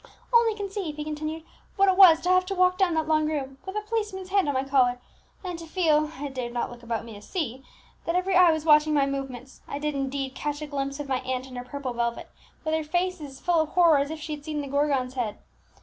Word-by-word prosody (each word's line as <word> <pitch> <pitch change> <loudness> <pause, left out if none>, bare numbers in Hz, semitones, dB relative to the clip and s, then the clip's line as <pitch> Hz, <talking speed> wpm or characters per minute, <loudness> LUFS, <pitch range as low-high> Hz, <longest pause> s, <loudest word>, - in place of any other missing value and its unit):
"Only 465 -2 +5
conceive," 395 -6 -4
he 300 - -4
continued, 310 +1 -4 0.3
"what 395 -1 +4
it 380 - +4
was 350 -4 +8
to 360 - -1
have 370 0 +5
to 390 - -2
walk 365 0 +3
down 360 -4 +3
that 315 -1 0
long 310 -1 +2
room, 270 -3 -4
with 380 - -5
a 425 - 0
policeman's 420 -4 -3
hand 390 -3 +2
on 285 - 0
my 260 - +1
collar, 255 -3 +2 0.4
and 355 -3 -5
to 330 - -9
feel 310 -3 +2
(I 290 - -4
dared 250 -3 -5
not 240 - -2
look 240 -1 -11
about 230 -1 -3
me 230 - -9
to 205 - -11
see) 265 - -4 0.4
that 335 - -1
every 370 +1 +1
eye 360 -2 +7
was 315 -1 -2
watching 300 0 +5
my 280 -1 +4
movements! 270 -2 -6
I - - -4
did 300 +1 -2
indeed 270 -1 -3
catch 290 +1 -3
a 305 - -5
glimpse 275 -1 -4
of 290 - -5
my 260 -2 0
aunt 255 0 -3
in 260 -1 -11
her 245 - -5
purple 260 0 -5
velvet, 235 0 -3 0.3
with 315 - 0
her 320 0 +1
face 355 +3 -1
as 270 -3 -9
full 350 -2 +2
of 315 - -2
horror 335 -4 +5
as 280 +1 -1
if 315 0 -5
she 310 0 -5
had 295 -1 -8
seen 300 -1 -3
the 285 - -6
Gorgon's 275 -2 0
head! 230 -5 -3
300 Hz, 260 wpm, -26 LUFS, 270-350 Hz, 0.4 s, was